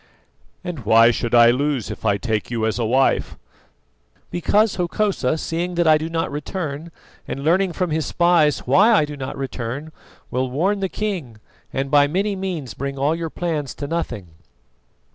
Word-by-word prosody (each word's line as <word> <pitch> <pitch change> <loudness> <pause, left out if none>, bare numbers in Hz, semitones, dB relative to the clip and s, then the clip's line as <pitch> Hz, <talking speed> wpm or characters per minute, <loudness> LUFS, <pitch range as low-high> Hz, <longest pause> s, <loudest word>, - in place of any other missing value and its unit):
"And 180 -5 -5
why 115 +2 +6
should 120 +1 -1
I 120 0 +7
lose 135 -1 -1
if - - -5
I 100 -1 +3
take 110 0 -2
you 115 -2 -1
as 110 +2 -1
a 115 - 0
wife?" 130 +4 +1 0.9
"Because 205 +5 +2
Hokosa, 175 -5 0
seeing 170 +3 -3
that 170 0 +2
I 155 -1 +5
do 160 +1 -4
not 165 -2 -2
return 150 +1 -5 0.4
and 135 - -5
learning 180 +3 +2
from 180 -2 -2
his 155 0 -1
spies 170 -4 +2
why 195 - +5
I 175 -9 +4
do 150 0 -7
not 135 -1 -6
return, 135 +2 -5 0.4
will 130 +1 -1
warn 185 +10 0
the 190 -1 -1
king, 180 - -4 0.3
and 135 +1 -3
by 145 -1 +5
many 195 +6 -1
means 175 - -4
bring 140 0 -5
all 140 +3 +1
your 165 0 -3
plans 155 -6 -3
to 145 - -5
nothing. 125 - -4
150 Hz, 175 wpm, -21 LUFS, 130-175 Hz, 0.9 s, I